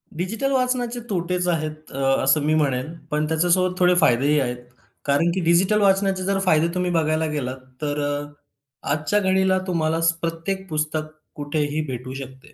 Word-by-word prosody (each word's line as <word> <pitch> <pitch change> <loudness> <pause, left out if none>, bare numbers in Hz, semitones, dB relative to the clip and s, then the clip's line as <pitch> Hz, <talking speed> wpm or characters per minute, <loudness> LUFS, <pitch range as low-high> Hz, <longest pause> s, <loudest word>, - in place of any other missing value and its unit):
Digital 215 - -2
वाचनाचे 250 -2 0
तोटेच 180 -1 -1
आहेत, 155 -2 -3
अ, - - -7 0.3
असं 150 +3 +3
मी 155 - +2
म्हणेन, 145 0 0 0.2
पण 150 0 +1
त्याच्यासोबत 175 +3 +2
थोडे 180 0 +4
फायदेही 145 0 +3
आहेत. 125 -2 -1 0.5
कारण 145 +5 +2
की 190 - 0
डिजिटल 185 +6 +3
वाचनाचे 195 -1 +2
जर 195 +1 0
फायदे 165 -4 +3
तुम्ही 180 0 -1
बघायला 160 -1 +1
गेलात 130 -3 -3 0.2
तर 145 -1 -2
अ, 145 0 -2 0.7
आजच्या 155 +8 +1
घडीला 190 -1 +2
तुम्हाला 165 -2 0 0.2
प्रत्येक 170 +4 -3
पुस्तक 155 0 -2 0.2
कुठेही 145 0 -1
भेटू 130 0 -6
शकते. 135 +1 -10
160 Hz, 155 wpm, -23 LUFS, 150-185 Hz, 0.7 s, थोडे